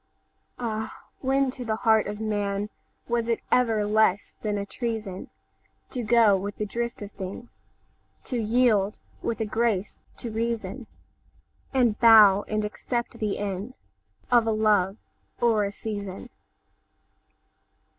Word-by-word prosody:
'Ah, 220 -2 -4
when 270 0 +1
to 255 -1 -7
the 220 -2 -1
heart 220 -1 +3
of 205 0 -4
manWas 210 +2 -3
it 230 - +1
ever 225 -4 +3
less 210 -2 +2
than 210 -1 -1
a 200 - -3
treasonTo 225 +2 -7
go 230 -3 +6
with 200 +1 -3
the 210 - -2
drift 235 +1 -4
of 205 - -8
things, 195 +5 -9 0.6
To 250 - -3
yield 215 -3 +2 0.2
with 230 - -2
a - - +1
grace 215 -2 -1 0.2
to 235 - -6
reason, 230 +1 -3 0.8
And 245 -5 +2
bow 210 -4 +7
and 215 0 -1
accept 235 +3 -4
the 210 -2 -1
endOf 205 +4 -4 0.7
a - - +3
love 215 -3 +2 0.4
or 225 -3 +3
a 200 - -3
season? 205 -3 -6
215 Hz, 125 wpm, -26 LUFS, 205-235 Hz, 0.8 s, bow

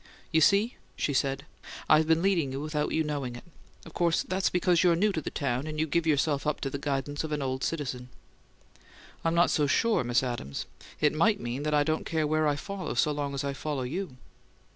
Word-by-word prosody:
"You 160 - +3
see?" 205 - +3 0.2
she 145 - -1
said. 135 +1 0 0.4
"I've 155 0 +5
been 165 +1 +3
leading 175 -8 +2
you 135 - -4
without 150 0 -2
your 160 - +1
knowing 140 -5 -3
it. 120 - -10 0.4
Of 165 - -12
course 170 -1 +2
that's 190 +1 0
because 180 -1 +2
you're 175 -2 +4
new 205 +5 +2
to 160 - -2
the - - -4
town, 135 0 -2
and 155 0 -4
you 160 - +2
give 165 +1 0
yourself 145 -1 +1
up 150 - 0
to 135 - -2
the 140 - -4
guidance 140 +1 -2
of 155 - -5
an 150 -2 -1
old 130 0 -2
citizen." 130 -6 -3 1.1
"I'm 165 0 +1
not 170 +1 +4
so 150 -2 +2
sure, 225 - +2
Miss 120 +1 +1
Adams. 120 - -4 0.3
It 150 -1 +3
might 205 +7 +3
mean 120 +3 -4
that 150 0 0
I 145 - +4
don't 155 +1 -1
care 160 -2 0
where 155 +1 +2
I 145 - +2
follow 195 +5 -5
so 150 - +2
long 145 -1 -3
as 135 - -2
I 140 0 -2
follow 140 -1 -3
you." 155 +1 -4
150 Hz, 225 wpm, -28 LUFS, 140-165 Hz, 1.1 s, I've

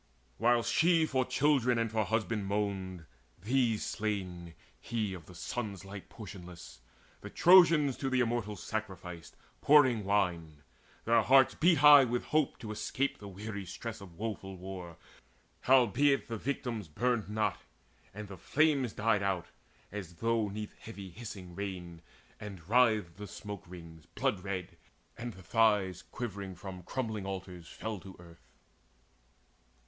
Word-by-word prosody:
While 120 0 +4
she 165 +3 +3
for 130 -4 +1
children 135 -4 +2
and 115 -1 0
for 110 -1 +1
husband 110 -2 -1
moaned 95 -4 -2 0.3
These 115 +2 +1
slain, 90 -6 -4 0.2
he 110 -4 -2
of 85 -4 -10
the 90 - -13
sun's 100 0 -5
light 100 0 -9
portionless 90 - -10 0.4
The - - -9
Trojans 165 -6 +6
to 135 - -2
the 130 -1 +1
Immortals 115 -4 -2
sacrificed, 90 -6 -6 0.3
Pouring 140 -6 +6
the 105 - -7
wine. 85 -7 0 0.4
Their 115 0 +5
hearts 130 +3 +5
beat 170 +2 +4
high 145 0 +9
with 120 0 -1
hope 155 -2 +1
To 110 -3 -6
escape 130 +6 -2
the 100 - -9
weary 100 +1 -6
stress 115 +4 -7
of 90 -4 -12
woeful 100 -3 -5
war. 90 -2 -8 0.7
Howbeit 135 +2 +4
the 115 - -3
victims 120 -5 -3
burned 110 +5 0
not, 105 0 0 0.5
and 105 +1 -8
the 100 -1 -9
flames 140 - +2
Died 105 -1 +1
out, 95 -3 -1 0.4
as 95 -4 -7
though 115 +3 +1
'neath 105 +1 -6
heavy 100 -4 -9
hissing 95 -4 -9
rain; 90 -3 -6 0.4
And 95 -6 -9
writhed 110 -6 +3
the 105 0 -7
smoke 105 +1 -8
wreaths 85 -3 -12
blood 100 - 0
red, 95 -3 -5 0.4
and 120 -1 -6
the 95 -1 -14
thighs 100 -3 +2
Quivering 100 -5 -6
from 95 0 -8
crumbling 110 -1 -4
altars 95 -3 -6
fell 110 -2 -5
to 95 +1 -12
earth. 85 -7 -17
105 Hz, 145 wpm, -32 LUFS, 95-120 Hz, 0.7 s, high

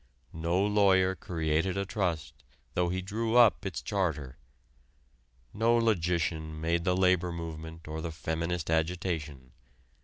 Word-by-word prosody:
No 85 +3 0
lawyer 100 -2 +4
created 80 +1 -1
a 100 - -1
trust 90 -7 -2 0.4
though 90 -1 +1
he 95 +1 -2
drew 110 +4 -2
up 115 -4 +5
its 95 - -5
charter; 80 - -2 1.1
no 115 +3 +3
logician 85 -7 0
made 85 +2 0
the 90 -1 +2
labor 90 -2 +3
movement 80 -1 -7
or 80 +1 -4
the 85 - -4
feminist 80 +1 -3
agitation. 80 -5 -2
85 Hz, 125 wpm, -30 LUFS, 80-95 Hz, 1.1 s, up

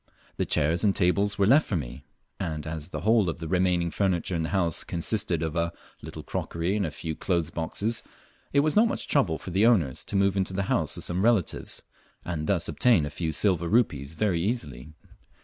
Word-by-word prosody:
The - - -1
chairs 80 +3 +1
and 100 -2 +3
tables 100 +2 +2
were 100 - +3
left 140 +9 +5
for 100 - -1
me; 65 -6 -7 0.3
and 80 -4 -3
as 80 0 -5
the - - -5
whole 110 -4 +3
of 80 - -4
the 80 -1 -6
remaining 90 -1 +1
furniture 95 -2 0
in 80 - -1
the 80 - -2
house 85 -5 0
consisted 85 -2 -1
of 80 -1 -3
a 85 0 0 0.3
little - - -8
crockery 85 +4 -2
and 100 -4 0
a - - -3
few 80 +1 -5
clothes 85 -3 -1
boxes, 105 +8 -2 0.5
it 140 - +4
was 155 +1 0
not 220 +3 +6
much - - -3
trouble 95 - +2
for 90 - -8
the 100 +6 +4
owners 80 - +2
to - - -4
move 100 0 +3
into 95 -1 -1
the 100 +1 -1
house - - 0
of - - -5
some 90 +2 -1
relatives, 110 -7 0 0.4
and 80 -3 -3
thus 90 -4 +1
obtain 115 -12 +3
a 75 - -5
few 80 +1 -2
silver 85 +1 +1
rupees 80 - +1
very 95 -5 +1
easily. 75 - -3
90 Hz, 210 wpm, -27 LUFS, 80-100 Hz, 0.5 s, not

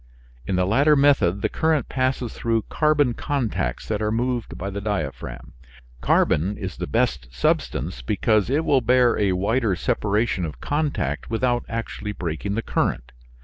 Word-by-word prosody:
In 95 - 0
the 90 0 +2
latter 140 +10 +4
method 115 -10 +3
the - - +3
current 160 -2 0
passes 130 -3 -1
through 115 -2 0
carbon 150 -5 +2
contacts 120 - -2
that 110 -1 -2
are 105 0 0
moved 120 +1 -2
by 100 +2 -4
the 100 +1 -4
diaphragm. 100 - -4 0.5
Carbon 85 +9 +2
is 95 -2 -6
the - - -4
best 65 - 0
substance, 60 -1 -1
because 105 - +1
it 150 +4 +1
will 135 -2 +3
bear 125 0 +4
a 100 -3 +2
wider 105 +2 +1
separation 105 -1 0
of 80 -3 -5
contact 145 - -2
without 120 +1 0
actually 110 -2 -4
breaking 90 +3 -3
the 115 - -2
current. - - -1
110 Hz, 155 wpm, -23 LUFS, 95-130 Hz, 0.5 s, latter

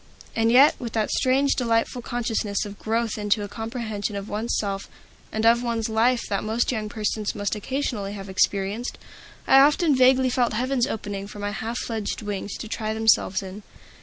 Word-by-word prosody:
And 225 0 +2
yet, 270 +5 +7
with 235 -3 -6
that 220 -2 0
strange, 270 +2 +2
delightful 230 0 0
consciousness 225 -4 -2
of 205 -1 -9
growth 225 0 -1
into 210 0 +1
a - - -4
comprehension 220 -2 -4
of 200 0 -5
one's 220 +3 -1
self 195 -1 -3 0.4
and 220 +1 -1
of 235 +1 +5
one's 230 -2 -1
life 235 +2 +2
that 200 - -1
most 225 +4 0
young 215 -3 -3
persons 215 0 -2
must 205 -1 -2
occasionally 215 -3 -3
have 195 -1 -7
experienced, 195 +4 0 0.5
I 270 - +7
often 295 +2 +4
vaguely 255 0 +4
felt 245 -2 +1
heavens 255 +2 0
opening 200 -4 -4
for 205 - -11
my 205 0 -3
half 225 +3 -4
fledged 220 -2 -3
wings 205 -1 -4
to - - -7
try 215 0 -3
themselves 220 -3 +3
in. 190 +2 -8
220 Hz, 180 wpm, -24 LUFS, 205-240 Hz, 0.5 s, yet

